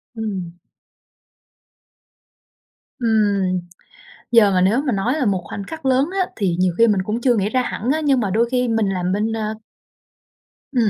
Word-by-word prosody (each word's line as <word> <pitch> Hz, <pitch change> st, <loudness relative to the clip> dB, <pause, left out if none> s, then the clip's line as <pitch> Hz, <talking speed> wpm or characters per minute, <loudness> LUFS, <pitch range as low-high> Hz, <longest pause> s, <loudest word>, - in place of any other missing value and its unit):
Ừm. 195 Hz, -6 st, -4 dB, 2.5 s
Ừm, 205 Hz, -5 st, +1 dB, 0.7 s
giờ 225 Hz, -4 st, +6 dB
mà 185 Hz, -1 st, +2 dB
nếu 205 Hz, +8 st, +3 dB
mà 255 Hz, -, +1 dB
nói 210 Hz, +7 st, 0 dB
là 300 Hz, -5 st, 0 dB
một 190 Hz, -3 st, +1 dB
khoảnh 200 Hz, +4 st, -6 dB
khắc 315 Hz, +3 st, -8 dB
lớn 265 Hz, +2 st, +3 dB
á 365 Hz, -, +2 dB
thì 185 Hz, -5 st, 0 dB
nhiều 180 Hz, -2 st, +1 dB
khi 230 Hz, -, +6 dB
mình 200 Hz, -4 st, +2 dB
cũng 215 Hz, +5 st, -3 dB
chưa 245 Hz, -2 st, +2 dB
nghĩ 200 Hz, 0 st, 0 dB
ra 255 Hz, +3 st, +1 dB
hẳn 245 Hz, 0 st, -3 dB
á, 315 Hz, -, 0 dB
nhưng 275 Hz, -4 st, +2 dB
mà 200 Hz, -3 st, -1 dB
đôi 235 Hz, +4 st, +1 dB
khi 250 Hz, -1 st, +1 dB
mình 225 Hz, -3 st, +1 dB
làm 180 Hz, -1 st, -1 dB
bên, 215 Hz, +2 st, 0 dB
a 215 Hz, 0 st, -3 dB, 1.2 s
Ừm, 235 Hz, -6 st, +2 dB
220 Hz, 175 wpm, -20 LUFS, 195-245 Hz, 2.5 s, giờ